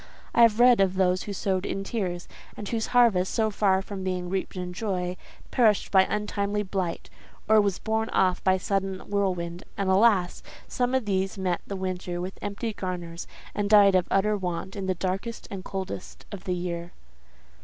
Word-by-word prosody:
I -, -, +4 dB
have 230 Hz, -1 st, +5 dB
read 245 Hz, -3 st, +6 dB
of 190 Hz, -1 st, +2 dB
those 185 Hz, 0 st, +2 dB
who 205 Hz, -, -5 dB
sowed 190 Hz, -1 st, -1 dB
in 195 Hz, -, -3 dB
tears, 185 Hz, -5 st, -3 dB, 0.3 s
and 205 Hz, -, -6 dB
whose 225 Hz, 0 st, -1 dB
harvest, 225 Hz, -7 st, +4 dB
so 220 Hz, -1 st, +2 dB
far 195 Hz, -2 st, +2 dB
from 195 Hz, -1 st, -6 dB
being 180 Hz, -1 st, -2 dB
reaped 190 Hz, 0 st, -2 dB
in 180 Hz, -1 st, -4 dB
joy, 180 Hz, -3 st, -2 dB, 0.4 s
perished 220 Hz, -5 st, +3 dB
by 190 Hz, -1 st, +6 dB
untimely 210 Hz, 0 st, -1 dB
blight, 185 Hz, -3 st, -3 dB, 0.4 s
or 220 Hz, 0 st, +6 dB
was 200 Hz, -3 st, 0 dB
borne 220 Hz, 0 st, -1 dB
off 185 Hz, -1 st, +1 dB
by 190 Hz, 0 st, +4 dB
sudden 195 Hz, 0 st, -2 dB
whirlwind; 180 Hz, -4 st, -1 dB
and, 195 Hz, -1 st, +1 dB
alas! 190 Hz, -3 st, +3 dB, 0.3 s
some 250 Hz, +1 st, 0 dB
of 260 Hz, -4 st, 0 dB
these 195 Hz, 0 st, -1 dB
met 185 Hz, -2 st, -1 dB
the 200 Hz, -, -4 dB
winter 185 Hz, -2 st, -3 dB
with 185 Hz, +2 st, -6 dB
empty 205 Hz, +2 st, -3 dB
garners, 175 Hz, -3 st, -5 dB, 0.3 s
and 205 Hz, -1 st, -1 dB
died 205 Hz, -2 st, +7 dB
of 185 Hz, -1 st, +3 dB
utter 210 Hz, +2 st, +2 dB
want 185 Hz, 0 st, -4 dB
in 195 Hz, -2 st, -4 dB
the 185 Hz, -, +1 dB
darkest 195 Hz, +6 st, -3 dB
and 195 Hz, -2 st, -6 dB
coldest 190 Hz, -1 st, -6 dB
of 200 Hz, -3 st, -8 dB
the 180 Hz, -, 0 dB
year." 175 Hz, -1 st, -4 dB
190 Hz, 185 wpm, -26 LUFS, 185-210 Hz, 0.4 s, died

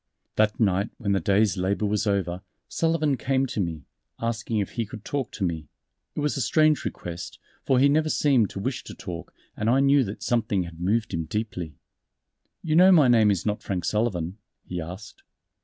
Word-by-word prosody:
That 105 Hz, -1 st, +2 dB
night 100 Hz, -2 st, +2 dB
when 105 Hz, -5 st, -2 dB
the 100 Hz, -, +2 dB
day's 100 Hz, +2 st, +2 dB
labor 95 Hz, +3 st, 0 dB
was 105 Hz, +1 st, 0 dB
over, 95 Hz, -3 st, 0 dB, 0.3 s
Sullivan 160 Hz, -4 st, +1 dB
came 135 Hz, +2 st, +1 dB
to 125 Hz, -4 st, -4 dB
me, 85 Hz, -6 st, -2 dB, 0.4 s
asking 115 Hz, -1 st, -2 dB
if 100 Hz, -2 st, -1 dB
he 115 Hz, -, -2 dB
could 110 Hz, -1 st, -10 dB
talk 140 Hz, -3 st, -2 dB
to 100 Hz, -, -4 dB
me. 80 Hz, -4 st, -2 dB, 0.5 s
It -, -, -2 dB
was 150 Hz, 0 st, 0 dB
a 135 Hz, -, -1 dB
strange 155 Hz, +4 st, +3 dB
request, 85 Hz, 0 st, -6 dB, 0.3 s
for 130 Hz, -, +4 dB
he 135 Hz, +3 st, +6 dB
never 155 Hz, +2 st, +2 dB
seemed 135 Hz, -9 st, +3 dB
to -, -, -6 dB
wish 125 Hz, +5 st, -3 dB
to -, -, -9 dB
talk, 85 Hz, -2 st, -7 dB, 0.2 s
and 110 Hz, +1 st, -1 dB
I 130 Hz, +3 st, +4 dB
knew 140 Hz, 0 st, +5 dB
that 100 Hz, +1 st, -7 dB
something 110 Hz, -5 st, +1 dB
had 85 Hz, -1 st, -10 dB
moved 105 Hz, +4 st, 0 dB
him 80 Hz, -1 st, -2 dB
deeply. 90 Hz, -6 st, -4 dB, 0.9 s
"You 155 Hz, -1 st, 0 dB
know 185 Hz, +3 st, +7 dB
my 155 Hz, -8 st, +6 dB
name 110 Hz, -3 st, +5 dB
is 100 Hz, -4 st, 0 dB
not 105 Hz, -1 st, -1 dB
Frank 90 Hz, -3 st, -3 dB
Sullivan," 100 Hz, -4 st, -1 dB, 0.3 s
he 90 Hz, -1 st, -4 dB
asked. 90 Hz, +6 st, -9 dB
105 Hz, 195 wpm, -25 LUFS, 95-130 Hz, 0.9 s, know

